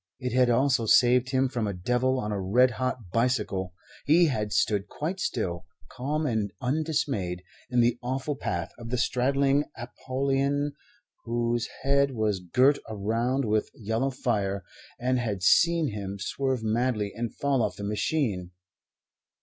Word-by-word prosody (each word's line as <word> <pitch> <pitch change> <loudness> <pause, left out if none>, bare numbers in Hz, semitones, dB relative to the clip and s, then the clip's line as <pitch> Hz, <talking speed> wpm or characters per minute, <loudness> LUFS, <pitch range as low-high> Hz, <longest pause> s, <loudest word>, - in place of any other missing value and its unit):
It 125 -2 -3
had 125 -1 +4
also 125 -1 +2
saved 125 +2 +5
him 130 0 +2
from 120 -4 -2
a 100 - -3
devil 125 +7 +1
on 105 -3 -3
a 100 -2 -2
red 125 +7 +4
hot 125 -5 -3
bicycle. 105 -7 0 0.3
He 170 +4 +5
had 105 -6 -2
stood 105 -1 +1
quite 165 - -4
still, 90 - -2 0.2
calm 150 +5 -2
and 110 -6 -1
undismayed, 130 - -1 0.3
in 125 -2 +3
the 120 +1 +2
awful 130 +4 -2
path 85 -9 -3
of 115 -1 -8
the 125 - -1
straddling 135 +3 +2
Apollyon 135 +4 -1 0.5
whose 120 0 0 0.2
head 140 -1 +2
was 105 -3 0
girt 125 - +3
around 115 +6 0
with 110 -1 0
yellow 115 +5 -1
fire, 100 -7 -1 0.3
and 125 +1 +1
had 105 -6 -3
seen 165 - +4
him 100 -2 -5
swerve 130 +4 -2
madly 110 -2 0
and 115 0 -4
fall 140 -3 +1
off - - -1
the 100 - -7
machine. 105 - -1
120 Hz, 150 wpm, -27 LUFS, 105-135 Hz, 0.5 s, saved